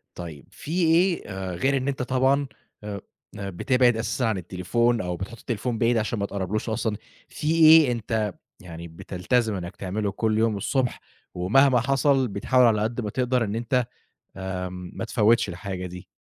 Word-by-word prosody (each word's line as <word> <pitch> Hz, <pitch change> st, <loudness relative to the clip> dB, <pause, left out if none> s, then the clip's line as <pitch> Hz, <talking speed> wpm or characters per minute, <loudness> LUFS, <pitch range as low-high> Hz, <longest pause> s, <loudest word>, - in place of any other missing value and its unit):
طيب 80 Hz, -5 st, -8 dB
فيه 170 Hz, +3 st, -2 dB
إيه 180 Hz, 0 st, +2 dB
آآ 95 Hz, -2 st, -5 dB
غير 135 Hz, +9 st, +1 dB
إن 130 Hz, +1 st, -3 dB
أنت 135 Hz, -2 st, -2 dB
طبعًا 130 Hz, +2 st, +2 dB, 0.4 s
آآ 100 Hz, -2 st, -5 dB, 0.4 s
آآ 100 Hz, -1 st, -4 dB
بتبعد 125 Hz, +5 st, +2 dB
أساسًا 110 Hz, +3 st, -2 dB
عن 110 Hz, -4 st, 0 dB
التليفون 110 Hz, +7 st, 0 dB
أو 90 Hz, -1 st, -3 dB
بتحُط 100 Hz, +5 st, -7 dB
التليفون 115 Hz, +1 st, -3 dB
بعيد 115 Hz, +1 st, +2 dB
عشان 110 Hz, 0 st, -1 dB
ما 100 Hz, -, 0 dB
تقربلهوش 100 Hz, +3 st, -3 dB
أصلًا، 110 Hz, -1 st, -1 dB, 0.3 s
فيه 160 Hz, +1 st, +2 dB
إيه 155 Hz, -4 st, +8 dB
أنت 110 Hz, -3 st, -2 dB, 0.3 s
يعني 85 Hz, -1 st, -9 dB
بتلتزم 100 Hz, +7 st, -1 dB
إنّك 85 Hz, 0 st, -6 dB
تعمله 100 Hz, +2 st, -2 dB
كل 110 Hz, +2 st, 0 dB
يوم 110 Hz, -2 st, +2 dB
الصبح 125 Hz, +4 st, -1 dB, 0.3 s
ومهما 125 Hz, +9 st, +4 dB
حصل 135 Hz, +1 st, +2 dB
بتحاول 125 Hz, +5 st, +2 dB
على 105 Hz, -2 st, +3 dB
قد 115 Hz, +3 st, -1 dB
ما 105 Hz, -, -3 dB
تقدر 125 Hz, 0 st, 0 dB
إن 105 Hz, 0 st, -3 dB
أنت 120 Hz, +2 st, -4 dB, 0.8 s
آآ 90 Hz, -1 st, -3 dB
ما 90 Hz, -1 st, -8 dB
متفوّتش 115 Hz, -1 st, +2 dB
الحاجة 90 Hz, +1 st, -5 dB
دي؟ 90 Hz, 0 st, -9 dB
110 Hz, 170 wpm, -25 LUFS, 95-125 Hz, 0.8 s, إيه